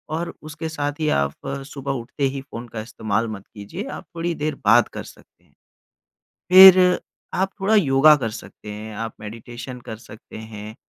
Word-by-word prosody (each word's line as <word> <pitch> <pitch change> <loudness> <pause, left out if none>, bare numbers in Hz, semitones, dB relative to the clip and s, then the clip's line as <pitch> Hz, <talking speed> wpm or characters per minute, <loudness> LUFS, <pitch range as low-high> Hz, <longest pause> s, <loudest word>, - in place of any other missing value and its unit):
और 170 +1 -4
उसके 155 +1 -6
साथ 145 -2 -2
ही 155 -1 +1
आप 70 0 0 0.4
सुबह 140 -1 -4
उठते 130 +4 -6
ही 135 - -4
फ़ोन 125 -3 -9
का 110 -1 -6
इस्तेमाल 110 0 -2
मत 100 -3 -7
कीजिए, 100 -2 -7
आप - - -8
थोड़ी 170 +1 -2
देर 150 -1 -2
बात 115 +3 +6
कर - - -6
सकते - - -18
हैं। - - -32 1.0
फिर 185 -1 +9 0.4
आप 190 +1 +1
थोड़ा 200 +3 +2
योगा 150 -4 +6
कर 120 -6 -3
सकते 105 -1 -10
हैं, 105 +1 -8
आप 115 +1 -5
मेडिटेशन 120 +4 -8
कर 110 - -5
सकते 110 - -12 0.2
हैं 105 +1 -8
130 Hz, 175 wpm, -22 LUFS, 110-155 Hz, 1.0 s, फिर